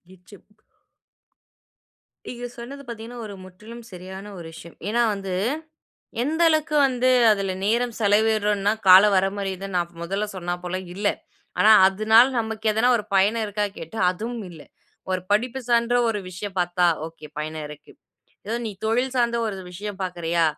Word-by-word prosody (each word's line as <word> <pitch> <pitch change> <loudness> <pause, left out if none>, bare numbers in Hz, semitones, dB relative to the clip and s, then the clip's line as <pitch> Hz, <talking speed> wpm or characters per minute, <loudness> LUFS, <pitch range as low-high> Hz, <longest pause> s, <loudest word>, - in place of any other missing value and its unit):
இச்சு 190 +3 -16
ப் 210 0 -32 1.7
நீங்க 245 0 -6
சொன்னது 270 +4 -8
பாத்தீங்கன்னா, 235 +1 -8
ஒரு 205 -2 -8
முற்றிலும் 220 +6 -12
சரியான 190 +3 -9
ஒரு 170 - -9
விஷயம். 165 +1 -12
ஏன்னா 235 +3 +1
வந்து 195 -2 -5 0.9
எந்த 320 +5 0
அளவுக்கு 310 -1 +1
வந்து 255 -1 0 0.2
அதில 195 -2 +1
நேரம் 235 +2 +1
செலவிடுறோன்னா, 210 -1 +2 0.2
கால 185 +1 +10
வரமுறை 195 0 0 0.2
நான் 170 -1 -2
மொதல்ல 195 +5 -2
சொன்னாப்போல 175 +1 -4 0.2
இல்லை. 205 +1 +1 0.5
ஆனா 220 +1 +7
அதுனால 215 +5 +5
நமக்கு 220 -1 -4
எதனா 220 +3 +2
ஒரு 210 - -5
பயனிருக்கா 210 +1 +1
கேட்டா, 165 +8 -8
அதுவும் 225 +3 -5
இல்லை. 160 -4 -13 0.4
ஒரு 185 -1 0
படிப்பு 240 +5 +1
சார்ந்த 235 0 +2
ஒரு 215 -2 -1
விஷயம் 190 +1 -7
பார்த்தா 175 0 +1 0.2
ஒகே 160 -2 -11
பயனிருக்கு. 150 -1 -7 0.6
ஏதோ 225 +3 -2
நீ 220 - -3
தொழில் 245 +4 0
சார்ந்த 235 -2 +1
ஒரு 200 - -4
விஷயம் 200 +2 -7
பாக்குறயா? 170 -2 -1
205 Hz, 140 wpm, -23 LUFS, 185-230 Hz, 1.7 s, கால